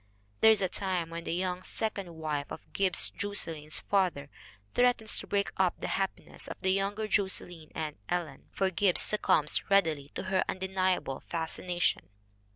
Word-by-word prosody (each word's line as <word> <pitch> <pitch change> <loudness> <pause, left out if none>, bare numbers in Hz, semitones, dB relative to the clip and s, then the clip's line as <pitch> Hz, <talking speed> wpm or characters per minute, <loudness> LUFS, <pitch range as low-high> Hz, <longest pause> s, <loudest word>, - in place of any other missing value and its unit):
There 220 - +7
is 215 -3 +4
a - - +3
time 180 -3 -1
when 170 0 -6
the - - -2
young 180 0 -1
second 195 -4 -3
wife 150 -3 -3
of - - -9
Gibbs 190 -2 +1
Jos 205 0 -2
selyn's 155 -2 -1
father 180 -8 0 0.4
threatens 245 -3 +3
to - - -7
break 200 0 0
up 185 -2 +2
the - - -4
happiness 195 -1 -3
of - - -7
the 190 - +2
younger 200 +2 -1
Josselyn 180 -6 -1
and 155 -2 -3
Ellen, 170 -6 -3
for 190 -1 0
Gibbs 185 +1 +3
succumbs 160 -7 +3
readily 160 -8 +3
to - - -3
her 190 0 +1
undeniable 185 -6 0
fascination. 175 +1 -1
185 Hz, 160 wpm, -30 LUFS, 165-195 Hz, 0.4 s, There